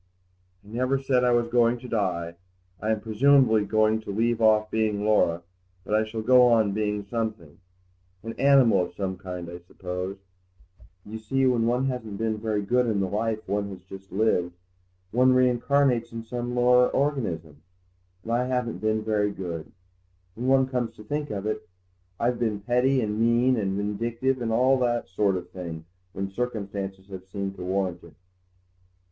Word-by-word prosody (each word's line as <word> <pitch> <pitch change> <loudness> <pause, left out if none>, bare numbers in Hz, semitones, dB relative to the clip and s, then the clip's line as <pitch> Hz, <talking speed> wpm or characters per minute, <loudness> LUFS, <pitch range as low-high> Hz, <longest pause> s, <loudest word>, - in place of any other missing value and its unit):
"I - - -15
never 130 +4 0
said 135 -2 +1
I 125 - +4
was 120 -1 +2
going 120 0 +3
to 125 - -10
die. 90 -7 -1 0.5
I 110 - -2
am 110 -1 0
presumably 110 -1 +4
going 110 +1 +2
to - - -11
leave 115 +3 0
off 110 -1 +4
being 105 -2 0
Laura, 85 -5 +2 0.4
but - - -4
I 110 0 +4
shall 110 0 -5
go 125 +1 +6
on 110 -4 +3
being 105 0 -2
something. 110 -8 -4 0.6
An 115 +1 -5
animal 135 -8 +5
of 90 - -5
some 95 -2 -3
kind, 90 -1 -7
I 85 +1 -8
suppose. 90 +2 -6 0.9
You 110 +2 -7
see, 135 +5 0
when 120 -3 +2
one 125 +2 +1
hasn't 120 -6 -4
been 110 0 -1
very 105 -2 -1
good 125 +4 +2
in 110 -3 0
the 95 - 0
life 110 +2 -2
one 100 +1 -1
has 95 -2 -10
just 95 +1 -12
lived, 90 -3 +1 0.6
one 130 +2 +4
reincarnates 125 -1 +2
in 115 0 -6
some 120 +1 -4
lower 125 0 +5
organism. 85 - -2 0.6
And 115 - -5
I 120 +2 +1
haven't 125 -3 -2
been 110 0 0
very 105 -1 +1
good, 85 -5 -6 0.6
when 120 +5 -4
one 135 0 +4
comes 125 -3 -2
to 105 - -12
think 145 +6 -3
of 100 -1 -4
it. 110 0 -3 0.5
I've 120 +1 0
been 110 -4 -1
petty 125 +4 +2
and 105 -1 -2
mean 120 +3 +3
and 100 -4 -1
vindictive 115 +5 -1
and 115 -1 -1
all 130 +3 +3
that 120 -1 0
sort 95 0 +1
of 90 -1 -6
thing 85 -3 -7 0.3
when 95 0 -4
circumstances 100 -4 -4
have 95 -1 -9
seemed 100 0 -4
to 90 - -6
warrant 95 -1 -2
it." - - -15
110 Hz, 175 wpm, -26 LUFS, 100-125 Hz, 0.9 s, go